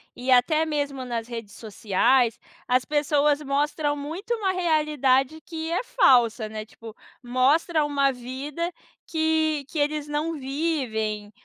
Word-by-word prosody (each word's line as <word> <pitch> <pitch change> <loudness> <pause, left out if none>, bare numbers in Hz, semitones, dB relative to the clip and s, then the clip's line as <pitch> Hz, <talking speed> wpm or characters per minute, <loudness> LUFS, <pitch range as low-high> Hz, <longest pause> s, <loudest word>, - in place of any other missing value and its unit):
e 255 +1 -2
até 310 +6 +4
mesmo 285 -4 -3
nas 235 -1 -4
redes 230 -4 -7
sociais, 225 +3 +1 0.3
as 250 0 +2
pessoas 295 0 +1
mostram 290 +1 0
muito 325 +11 -4
uma 415 -5 0
realidade 305 -5 +1
que 325 0 -6
é 360 - 0
falsa, 240 - +3
né. 215 0 -6
Tipo, 225 0 -12 0.3
mostra 285 +6 +2
uma 280 -1 +2
vida 270 +7 -5 0.3
que 315 -2 0
que 330 - -7
eles 295 0 0
não 300 +3 -2
vivem 260 -8 -2
285 Hz, 130 wpm, -25 LUFS, 250-315 Hz, 0.3 s, até